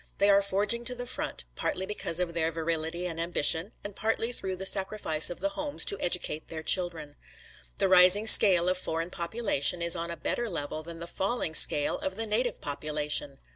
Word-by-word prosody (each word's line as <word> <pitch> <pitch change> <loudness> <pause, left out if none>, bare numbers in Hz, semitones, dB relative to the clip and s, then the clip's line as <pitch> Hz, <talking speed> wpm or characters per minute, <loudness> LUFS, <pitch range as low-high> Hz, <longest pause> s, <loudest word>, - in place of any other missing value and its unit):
They 200 +1 +2
are 200 0 +3
forging 205 +4 -1
to 250 - -2
the 245 0 -7
front, 245 - -5
partly 190 - -4
because 190 -4 -4
of 175 -2 -3
their 165 -1 -2
virility 165 +1 -4
and 165 -2 -5
ambition, 170 +2 +2
and 205 -1 -8
partly 225 +1 -2
through 190 -6 -6
the 190 +1 -7
sacrifice 190 -5 0
of 175 - -4
the 295 - -1
homes 295 -1 -1
to 200 - 0
educate 175 -3 -1
their 160 -1 -9
children. 160 -4 +1 0.6
The - - 0
rising 185 +3 +6
scale 185 -5 +7
of 185 0 -1
foreign 165 0 -5
population 175 -3 0
is 170 0 +2
on 170 0 -5
a 170 - -7
better 235 +8 -3
level 155 -3 -6
than 165 +1 -9
the 170 - -7
falling 190 -1 -3
scale 145 -2 +4
of 190 - -5
the 225 +2 -5
native 225 +2 -3
population. 150 -1 -2
180 Hz, 195 wpm, -27 LUFS, 165-205 Hz, 0.6 s, scale